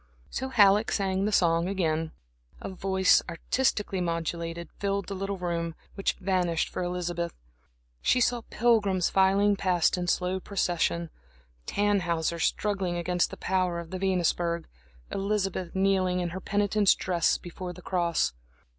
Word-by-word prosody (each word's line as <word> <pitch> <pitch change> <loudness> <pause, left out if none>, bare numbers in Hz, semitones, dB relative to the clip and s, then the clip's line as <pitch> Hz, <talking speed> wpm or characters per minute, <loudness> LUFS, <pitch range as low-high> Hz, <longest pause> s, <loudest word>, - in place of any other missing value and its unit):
So 265 - -3
Halleck 210 -2 +5
sang 195 -1 0
the 210 - 0
song 170 -3 +3
again. 160 -4 -1 0.5
A - - -6
voice, 190 0 +3
artistically 200 +1 0
modulated, 170 0 -3
filled 200 -1 -1
the 200 - -5
little 195 +1 -3
room, 170 -2 -2 0.2
which 195 - 0
vanished 180 -3 0
for - - -4
Elizabeth. 175 -1 -3 0.7
She 255 - +3
saw 245 0 +2
pilgrims 205 -6 +2
filing 195 +2 +4
past 180 -2 +1
in 175 - -3
slow 180 +2 0
procession, 175 -3 -1 0.6
Tannhäuser 175 -5 0
struggling 195 -3 0
against 175 0 0
the - - -9
power 185 -2 0
of 170 -1 -7
the 185 - -4
Venusberg, 175 -3 0 0.5
Elizabeth 195 -3 -2
kneeling 190 -1 +2
in 175 -1 -1
her 185 +3 -6
penitent's 205 0 +2
dress 175 -3 +1
before 180 +1 -7
the 180 0 -12
cross. 170 - 0
185 Hz, 135 wpm, -28 LUFS, 170-195 Hz, 0.7 s, Halleck